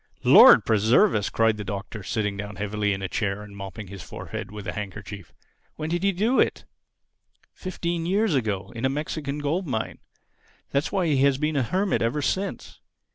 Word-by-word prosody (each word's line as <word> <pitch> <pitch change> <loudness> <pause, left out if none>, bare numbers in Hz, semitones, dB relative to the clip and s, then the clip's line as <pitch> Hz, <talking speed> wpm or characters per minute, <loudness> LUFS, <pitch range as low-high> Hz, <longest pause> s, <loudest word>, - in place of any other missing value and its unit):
_" - - -44 0.2
"Lord - - +8
preserve 115 - +4
us!" 105 -2 0
cried 115 -1 +2
the 105 - -5
Doctor, 100 +2 -6
sitting 105 +1 -2
down 100 0 -6
heavily 105 +1 -1
in 95 0 -3
a - - -1
chair 100 +1 -2
and 105 -1 -12
mopping 100 +1 -7
his 95 0 -9
forehead - - -7
with 105 -1 -8
a - - -3
handkerchief. 100 -2 -7 0.4
"When 155 +1 -4
did 175 0 0
he 195 +1 +3
do 215 +8 +1
it?" - - +1 0.9
"Fifteen 170 -2 -3
years 200 +1 +2
ago—in 110 -2 -2
a 130 - +3
Mexican 145 0 -3
gold 155 +5 -1
mine. 110 -5 -3 0.7
That's 140 +2 0
why 190 -3 +1
he 150 -4 +2
has 135 0 +3
been 150 +2 -1
a 140 - +2
hermit 185 - 0
ever 125 +6 0
since. 195 +6 -3
115 Hz, 185 wpm, -25 LUFS, 105-160 Hz, 0.9 s, Lord